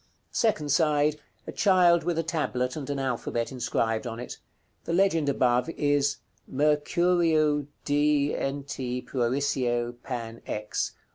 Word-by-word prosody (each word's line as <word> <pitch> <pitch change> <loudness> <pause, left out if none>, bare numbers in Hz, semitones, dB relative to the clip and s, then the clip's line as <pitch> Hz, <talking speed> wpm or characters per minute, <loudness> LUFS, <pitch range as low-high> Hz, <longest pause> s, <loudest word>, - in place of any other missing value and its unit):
Second 155 -11 +1
side. 150 -1 +2 0.3
A - - -6
child 180 -4 +4
with 170 0 -1
a 165 - +1
tablet, 140 -6 -1
and 145 -3 -6
an 140 - -1
alphabet 120 -2 -2
inscribed 115 -2 -1
on 115 0 -5
it. 125 - -7 0.5
The - - -2
legend 170 -5 +2
above 125 0 +2
is 145 -3 +1 0.3
"MECUREU^s 155 0 +2 0.2
DNT. 140 -3 0
PUERICIE 120 -2 0
PAN. 115 -3 -6
X." 105 0 -3
145 Hz, 120 wpm, -27 LUFS, 125-155 Hz, 0.5 s, child